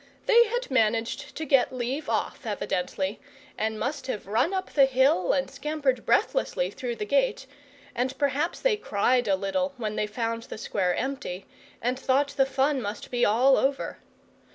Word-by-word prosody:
They 470 Hz, 0 st, +6 dB
had 485 Hz, -, -3 dB
managed 230 Hz, -1 st, 0 dB
to 315 Hz, -, -4 dB
get 270 Hz, -3 st, +3 dB
leave 255 Hz, +4 st, -3 dB
off, -, -, -2 dB
evidently, 190 Hz, +2 st, -2 dB, 0.4 s
and 220 Hz, 0 st, -2 dB
must 275 Hz, 0 st, -3 dB
have 215 Hz, -5 st, -4 dB
run 230 Hz, -, +1 dB
up 380 Hz, -1 st, -3 dB
the 275 Hz, -2 st, +6 dB
hill 260 Hz, -8 st, +3 dB
and 270 Hz, -1 st, +1 dB
scampered 280 Hz, -2 st, -2 dB
breathlessly -, -, +1 dB
through 245 Hz, -3 st, -4 dB
the 210 Hz, -, -4 dB
gate; 270 Hz, +2 st, +1 dB, 0.5 s
and 260 Hz, +2 st, -2 dB
perhaps 290 Hz, +4 st, 0 dB
they 485 Hz, -4 st, +2 dB
cried 245 Hz, -, +1 dB
a 195 Hz, -, +3 dB
little 275 Hz, +9 st, -2 dB
when 215 Hz, -3 st, -3 dB
they 210 Hz, -, 0 dB
found 230 Hz, +1 st, -2 dB
the -, -, -8 dB
square 190 Hz, -4 st, 0 dB
empty, 260 Hz, -9 st, -4 dB, 0.4 s
and 250 Hz, +2 st, 0 dB
thought 275 Hz, +2 st, +2 dB
the 275 Hz, -1 st, +1 dB
fun 270 Hz, +1 st, +1 dB
must 205 Hz, -1 st, -6 dB
be 245 Hz, -1 st, 0 dB
all 250 Hz, +6 st, +4 dB
over. 275 Hz, +1 st, -1 dB
260 Hz, 170 wpm, -27 LUFS, 220-280 Hz, 0.5 s, They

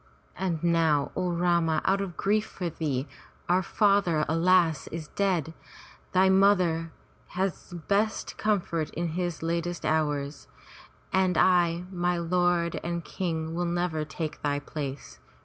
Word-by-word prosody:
And 175 Hz, -4 st, -2 dB
now, 160 Hz, -4 st, +2 dB
O 180 Hz, -, -1 dB
Rama, 170 Hz, -2 st, +2 dB
out 195 Hz, +1 st, +2 dB
of 185 Hz, -3 st, -5 dB
grief 210 Hz, +2 st, +1 dB
for 175 Hz, -3 st, -4 dB
thee, 145 Hz, -4 st, -2 dB, 0.4 s
our 180 Hz, +2 st, +3 dB
father, 195 Hz, -5 st, +2 dB
alas! 165 Hz, -1 st, +3 dB
is 160 Hz, -2 st, -6 dB
dead, 180 Hz, -6 st, 0 dB, 0.6 s
thy 190 Hz, +1 st, +4 dB
mother 185 Hz, -4 st, +3 dB, 0.4 s
his 185 Hz, -1 st, -3 dB
best 210 Hz, +2 st, 0 dB
comfort 175 Hz, -7 st, 0 dB
in 170 Hz, +1 st, -1 dB
his 175 Hz, -1 st, -3 dB
latest 170 Hz, +1 st, -2 dB
hours. 150 Hz, -2 st, -1 dB, 0.7 s
And 185 Hz, -2 st, +2 dB
I, 175 Hz, -2 st, +3 dB
my 175 Hz, -1 st, 0 dB
lord 175 Hz, 0 st, +1 dB
and 170 Hz, -1 st, -3 dB
King, 160 Hz, -3 st, -3 dB
will 175 Hz, +1 st, -1 dB
never 175 Hz, -2 st, -1 dB
take 155 Hz, 0 st, -5 dB
thy 145 Hz, -1 st, 0 dB
place. 145 Hz, -1 st, -6 dB
170 Hz, 130 wpm, -27 LUFS, 160-185 Hz, 0.7 s, thy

